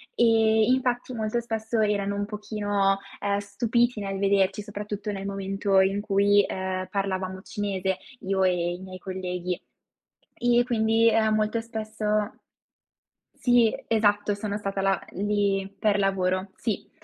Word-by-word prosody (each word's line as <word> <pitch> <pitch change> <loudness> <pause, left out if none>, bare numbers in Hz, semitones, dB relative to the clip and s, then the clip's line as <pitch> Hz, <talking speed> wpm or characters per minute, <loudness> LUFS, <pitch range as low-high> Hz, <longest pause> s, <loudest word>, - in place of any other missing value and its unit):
Ehm, 220 0 +4
infatti, 250 -1 -1
molto 220 0 -1
spesso 225 0 -2
erano 200 -1 +1
un 205 0 -1
pochino, 205 -2 0 0.2
ehm, 200 0 +1
stupiti 230 +3 0
nel 195 -1 -3
vederci, 195 0 +2
soprattutto 210 0 -5
nel 195 -1 -5
momento 195 0 +1
in 195 +1 +1
cui, 205 0 +4
ehm, 185 0 -3
parlavamo 190 -1 -2
cinese, 190 -2 -2 0.2
io 190 0 0
e 185 - +4
e 175 0 -1
i 175 - -7
miei 185 0 -9
colleghi. 180 -1 -4 0.8
E 245 0 +3
quindi, 225 -1 +3
ehm, 220 -1 +3
molto 215 +1 +1
spesso 215 -1 -2 1.0
sì, 245 -3 +3
esatto, 205 -2 +2
sono 205 0 -3
stata 195 -1 -3
là 195 0 +2
uhm, 195 - -3
lì, 200 -1 0
per 205 -1 +2
lavoro, 190 0 0
sì. 220 -5 -3
205 Hz, 140 wpm, -26 LUFS, 195-220 Hz, 1.0 s, Ehm